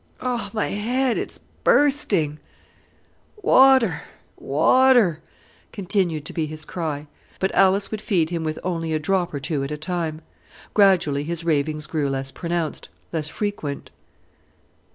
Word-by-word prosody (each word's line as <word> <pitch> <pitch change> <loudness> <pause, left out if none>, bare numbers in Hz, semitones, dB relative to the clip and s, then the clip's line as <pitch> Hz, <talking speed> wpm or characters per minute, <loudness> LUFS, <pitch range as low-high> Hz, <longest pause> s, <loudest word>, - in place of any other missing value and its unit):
"Oh, 245 -5 -2
my 215 -2 -1
head! 245 +4 0
it's - - -5 0.3
bursting." 200 - +2 1.0
"Water! 260 - +5 0.3
water!" 210 - +3 0.5
continued 185 -6 -1
to - - -6
be 160 -2 -1
his 155 0 -6
cry; 155 -4 -4 0.3
but 190 - 0
Alice 195 +1 +3
would 215 -1 -4
feed 175 -7 0
him 170 -2 -2
with 155 -1 -3
only 165 -3 -2
a 155 - +1
drop 180 +2 0
or 145 - -4
two 140 +1 -2
at 135 - -4
a 150 - -4
time. 160 -1 -3 0.5
Gradually 180 -9 +3
his 170 +2 -4
ravings 155 -1 0
grew 150 -3 -1
less 135 0 -3
pronounced, 170 -1 -3 0.2
less 155 -2 -1
frequent. 205 -10 -4
170 Hz, 135 wpm, -23 LUFS, 155-205 Hz, 1.0 s, Water